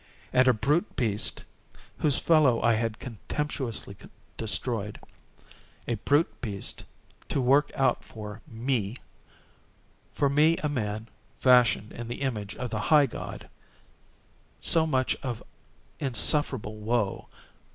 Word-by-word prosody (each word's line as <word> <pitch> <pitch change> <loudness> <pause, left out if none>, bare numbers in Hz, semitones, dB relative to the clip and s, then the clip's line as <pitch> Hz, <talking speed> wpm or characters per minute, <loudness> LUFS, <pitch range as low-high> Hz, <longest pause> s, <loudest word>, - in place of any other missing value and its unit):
And 130 0 +5
_a 125 -4 +3
brute 155 - +1
beast 110 -3 +1 0.6
_—whose 145 -3 +3
fellow 150 -8 +4
I 115 - +4
had 110 -1 -1
contemptuously 125 -2 -4 0.4
destroyed—a 110 -1 -5
brute 145 +4 +1
beast 100 -5 -3 0.4
to - - 0
work 135 +3 +4
out 130 -2 +1
for 105 -1 -9
me—for 115 -3 -2 1.3
me 150 +4 +4
a 150 - -2
man, 110 -5 -3 0.3
fashioned 125 -4 +4
in 120 -1 -7
the 120 +3 -6
image 105 -7 -3
of 125 -2 -5
the 105 - -2
High 150 -2 +7
God—so 160 +5 -5
much 130 -4 +1
of 120 -4 -4 0.6
insufferable 130 -4 +2
woe! 105 -2 -1
125 Hz, 110 wpm, -27 LUFS, 110-140 Hz, 1.3 s, High